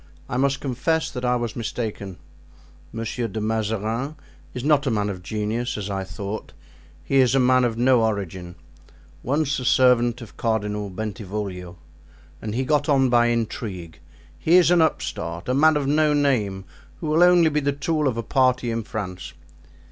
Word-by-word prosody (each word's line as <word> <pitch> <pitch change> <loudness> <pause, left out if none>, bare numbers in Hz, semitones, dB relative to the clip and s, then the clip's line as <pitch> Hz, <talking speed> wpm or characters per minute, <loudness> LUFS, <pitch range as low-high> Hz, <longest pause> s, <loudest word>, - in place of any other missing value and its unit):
I - - -4
must 135 +1 +1
confess 145 +5 -1
that 125 -2 -6
I 125 0 +2
was 120 -2 -3
mistaken. 105 -5 -4 0.7
Monsieur 115 +1 -3
de 110 +1 -5
Mazarin 110 +5 -2 0.4
is 125 - -6
not 145 -1 +3
a - - +3
man 105 -3 0
of 90 -2 -8
genius, 110 +6 -3
as 100 -1 -4
I 95 -1 -2
thought, 100 +3 -6 0.5
he 135 - 0
is 130 0 +4
a - - +4
man 130 0 +4
of 115 -2 0
no 125 0 +4
origin—once 90 - -4
a 125 - -5
servant 120 -2 +4
of 115 - -12
Cardinal 105 -2 -1
Bentivoglio, 95 -3 -5 0.6
and 110 0 -4
he 130 +2 -1
got 145 0 +1
on 135 -2 +4
by 120 -1 +4
intrigue. 105 -7 -3 0.4
He 165 - +3
is 180 -1 +6
an 175 -2 +5
upstart, 85 - -2
a 125 - +1
man 155 +3 +4
of 145 - -1
no 150 +1 +2
name, 110 -10 0 0.3
who - - -6
will 155 +2 +2
only 175 -2 +6
be 150 - +1
the 140 -1 0
tool 150 +1 -1
of 120 -3 -1
a 115 - -2
party 130 -1 +1
in 115 0 -2
France. 100 -5 -6
120 Hz, 170 wpm, -23 LUFS, 105-135 Hz, 0.7 s, is